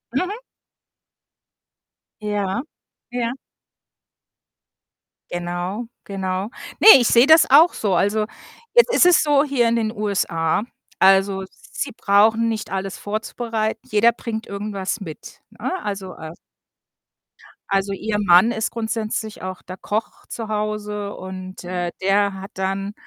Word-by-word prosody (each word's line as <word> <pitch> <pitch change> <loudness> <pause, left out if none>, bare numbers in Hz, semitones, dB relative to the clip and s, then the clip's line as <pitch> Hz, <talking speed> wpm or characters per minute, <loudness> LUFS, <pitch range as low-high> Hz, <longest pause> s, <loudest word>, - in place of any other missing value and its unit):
Mhm. 365 +8 0 1.9
Ja. 205 0 -2 0.5
Ja. 240 -1 -2 2.0
Genau, 175 +5 -4 0.2
genau. 190 0 -3 0.3
Ne, - - +4
ich 240 - +2
sehe 240 +3 +5
das 320 +1 +6
auch 310 +6 +7
so. 200 -4 0
Also, 205 +4 +1 0.5
jetzt 480 0 +5
ist - - +5
es 360 -2 +5
so 290 -2 +3
hier 275 -5 +1
in 235 - +1
den 220 -2 0
USA 195 -5 0 0.4
also, 195 0 +4
sie 275 - -7
brauchen 220 +3 +3
nicht 220 -2 -3
alles 195 0 -4
vorzubereiten. 220 +1 -3
Jeder 215 +3 +4
bringt 230 -1 -6
irgendwas 200 0 -4
mit, 160 -5 -10
ne? - - -5
Also 195 -2 -5
äh 160 0 -8 1.4
also, 195 0 0
ihr 210 +2 -2
Mann 195 +2 +5
ist 220 -2 -2
grundsätzlich 220 -1 -3
auch 185 0 -6
der 185 +1 -9
Koch 215 +3 -4
zu 225 -2 -6
Hause 210 -1 -3
und, 185 0 -8
äh, 175 -1 -3
der 200 +1 +2
hat 195 - -9
dann 195 +1 -3
205 Hz, 125 wpm, -21 LUFS, 190-225 Hz, 2.0 s, auch